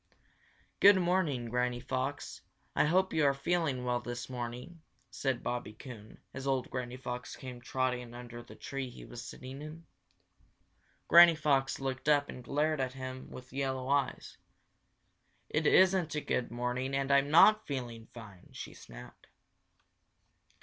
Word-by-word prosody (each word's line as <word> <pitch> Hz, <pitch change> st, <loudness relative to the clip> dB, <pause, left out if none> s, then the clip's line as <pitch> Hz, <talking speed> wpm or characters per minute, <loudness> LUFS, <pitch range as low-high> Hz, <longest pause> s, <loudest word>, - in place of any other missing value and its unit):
"Good 200 Hz, 0 st, +8 dB
morning, 175 Hz, -9 st, +1 dB
Granny 125 Hz, +1 st, 0 dB
Fox. 130 Hz, +3 st, -4 dB, 0.3 s
I -, -, +4 dB
hope 185 Hz, +4 st, +2 dB
you 155 Hz, -, +2 dB
are 140 Hz, -1 st, +4 dB
feeling 140 Hz, -3 st, 0 dB
well 125 Hz, 0 st, +1 dB
this 120 Hz, +1 st, -6 dB
morning," 125 Hz, +7 st, -6 dB, 0.3 s
said 130 Hz, -3 st, -2 dB
Bobby 120 Hz, -3 st, -3 dB
Coon, 110 Hz, -2 st, -11 dB, 0.2 s
as 135 Hz, +1 st, -6 dB
old 130 Hz, -2 st, 0 dB
Granny 125 Hz, 0 st, -4 dB
Fox 125 Hz, -1 st, -6 dB
came 125 Hz, -2 st, -9 dB
trotting 125 Hz, -1 st, -2 dB
under 120 Hz, -1 st, -8 dB
the 120 Hz, -, -13 dB
tree 135 Hz, -1 st, -5 dB
he 125 Hz, -, -11 dB
was 120 Hz, -1 st, -8 dB
sitting 130 Hz, +2 st, -9 dB
in. 155 Hz, +2 st, -9 dB, 1.2 s
Granny 170 Hz, -1 st, +9 dB
Fox 140 Hz, -3 st, +1 dB
looked 135 Hz, +1 st, -2 dB
up 145 Hz, -1 st, +3 dB
and 125 Hz, -, -8 dB
glared 150 Hz, +3 st, 0 dB
at 130 Hz, -1 st, -2 dB
him 130 Hz, 0 st, -7 dB
with 130 Hz, 0 st, -11 dB
yellow 135 Hz, -1 st, -2 dB
eyes. 140 Hz, 0 st, -1 dB, 1.1 s
"It 155 Hz, 0 st, +1 dB
isn't 185 Hz, -4 st, +4 dB
a 150 Hz, -, -1 dB
good 125 Hz, -, -1 dB
morning 125 Hz, +3 st, -2 dB
and 135 Hz, 0 st, 0 dB
I'm 140 Hz, 0 st, +4 dB
not 215 Hz, +7 st, +6 dB
feeling 120 Hz, -5 st, -5 dB
fine!" 105 Hz, -6 st, -12 dB
she -, -, -8 dB
snapped. -, -, -13 dB
130 Hz, 150 wpm, -32 LUFS, 125-150 Hz, 1.2 s, Granny